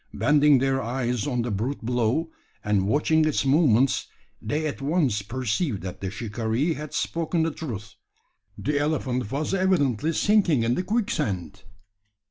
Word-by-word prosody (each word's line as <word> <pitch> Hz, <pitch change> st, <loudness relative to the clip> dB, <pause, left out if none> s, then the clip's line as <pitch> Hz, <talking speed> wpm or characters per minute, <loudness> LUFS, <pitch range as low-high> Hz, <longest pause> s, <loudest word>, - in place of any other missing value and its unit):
Bending 150 Hz, -1 st, +4 dB
their 135 Hz, +1 st, +1 dB
eyes 120 Hz, 0 st, -2 dB
on 125 Hz, -4 st, 0 dB
the 120 Hz, -, -3 dB
brute 115 Hz, +5 st, -3 dB
below, 125 Hz, +7 st, 0 dB, 0.3 s
and 100 Hz, -2 st, +1 dB
watching 155 Hz, +6 st, +3 dB
its 155 Hz, -3 st, +1 dB
movements, 135 Hz, -3 st, +3 dB, 0.3 s
they 155 Hz, +1 st, -2 dB
at 145 Hz, -2 st, -4 dB
once 140 Hz, -, +1 dB
perceived 120 Hz, -, -2 dB
that 90 Hz, -2 st, -7 dB
the 95 Hz, -, -2 dB
shikaree 115 Hz, -, -1 dB
had 150 Hz, -1 st, -7 dB
spoken 165 Hz, 0 st, -1 dB
the 165 Hz, -, 0 dB
truth. 115 Hz, -8 st, -7 dB, 0.6 s
The 145 Hz, 0 st, -1 dB
elephant 130 Hz, -6 st, -1 dB
was 145 Hz, +6 st, -2 dB
evidently 165 Hz, -, +1 dB
sinking 185 Hz, -, +3 dB
in 115 Hz, +1 st, +1 dB
the 180 Hz, -, 0 dB
quicksand! 100 Hz, -, -2 dB
135 Hz, 145 wpm, -25 LUFS, 115-155 Hz, 0.6 s, Bending